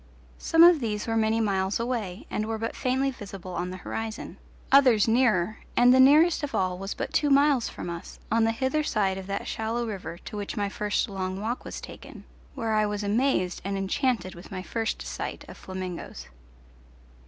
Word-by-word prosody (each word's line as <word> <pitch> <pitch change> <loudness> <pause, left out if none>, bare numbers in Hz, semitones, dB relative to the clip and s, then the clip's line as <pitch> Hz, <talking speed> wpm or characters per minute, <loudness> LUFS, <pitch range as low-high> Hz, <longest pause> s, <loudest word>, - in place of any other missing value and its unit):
Some 325 0 +5
of 345 -2 +8
these 210 -4 -2
were 225 - -1
many 220 0 +2
miles 195 -2 0
away 230 -6 -3
and 215 - -2
were 225 0 -2
but 225 +1 -4
faintly 265 +1 0
visible 195 -6 -9
on 175 +1 -2
the 185 - -6
horizon, 225 -1 -5 0.3
others 255 -7 +6
nearer, 220 -4 +2 0.2
and 245 +1 +7
the 260 - +5
nearest 305 +6 +6
of 290 -2 -4
all 185 -1 0
was 195 +1 -4
but - - -4
two 295 - +2
miles 280 -3 +4
from - - -7
us, 170 0 -7
on 230 0 +3
the 225 - +3
hither 265 +6 0
side 195 -9 0
of 190 - -9
that 200 0 -3
shallow 230 +2 -2
river 185 -6 -6
to 200 - -9
which 205 -1 -5
my 205 -1 0
first 210 +3 -1
long 190 -2 -4
walk 230 +4 -3
was - - -6
taken, - - -11 0.3
where 225 -1 -1
I 215 0 +3
was 205 0 -3
amazed 205 -4 +1
and 195 +1 -2
enchanted 200 0 0
with 175 - -12
my 185 -1 -5
first 225 +2 -3
sight - - -5
of - - -10
flamingoes. 185 - -7
220 Hz, 195 wpm, -27 LUFS, 195-250 Hz, 0.3 s, of